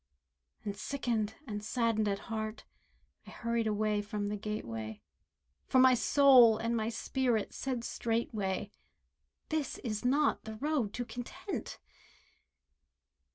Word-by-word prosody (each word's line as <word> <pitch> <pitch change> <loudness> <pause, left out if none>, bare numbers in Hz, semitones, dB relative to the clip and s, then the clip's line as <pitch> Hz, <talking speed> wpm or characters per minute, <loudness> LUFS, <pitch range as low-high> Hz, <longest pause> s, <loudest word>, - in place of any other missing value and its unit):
And 200 -1 -3
sickened, 220 -2 -2
and 210 -4 -5
saddened 225 -1 +1
at 200 -1 +1 0.2
heart, 215 0 -4 0.6
I - - -9
hurried 235 -1 -1
away 210 0 +1
from 205 0 -3
the 210 - -2
gateway, 115 - -5 0.7
For - - +2
my 255 0 +7
soul 250 -3 +7
and 230 +1 -1
my 220 -1 0
spirit 235 -2 0
said 255 -3 -3
straightway. 225 -5 -2 0.8
"This 310 -3 -1
is 215 -4 -3
not 280 +4 +2
the 220 0 -6
road 275 -4 0
to 245 - -2
Content." 335 - -6
225 Hz, 120 wpm, -32 LUFS, 210-250 Hz, 0.8 s, my